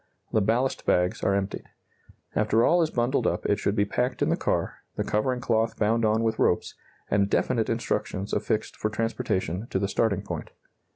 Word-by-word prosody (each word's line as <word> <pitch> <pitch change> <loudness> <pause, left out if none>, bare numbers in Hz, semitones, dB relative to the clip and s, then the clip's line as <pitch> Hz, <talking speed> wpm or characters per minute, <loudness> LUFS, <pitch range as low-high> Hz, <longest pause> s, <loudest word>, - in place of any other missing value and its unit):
The 110 - +3
ballast 120 +6 0
bags 90 0 +2
are 100 - +2
emptied. 100 0 -2 0.7
After 110 +2 +3
all 175 0 +4
is 160 - +2
bundled 120 -1 +1
up - - -1
it 100 - +2
should 100 - 0
be 100 - +2
packed 125 +5 -1
in - - +1
the - - +3
car, - - -1 0.2
the - - -1
covering 125 +4 0
cloth 110 -1 +1
bound 110 +2 +2
on 110 +1 +2
with 110 -1 0
ropes, 90 - +1 0.4
and 100 -1 +3
definite - - +1
instructions 100 +2 -2
affixed 110 - -1
for 110 - -1
transportation 110 -3 -2
to - - -1
the 100 +1 0
starting 105 -1 0
point. - - -5
110 Hz, 185 wpm, -26 LUFS, 100-115 Hz, 0.7 s, all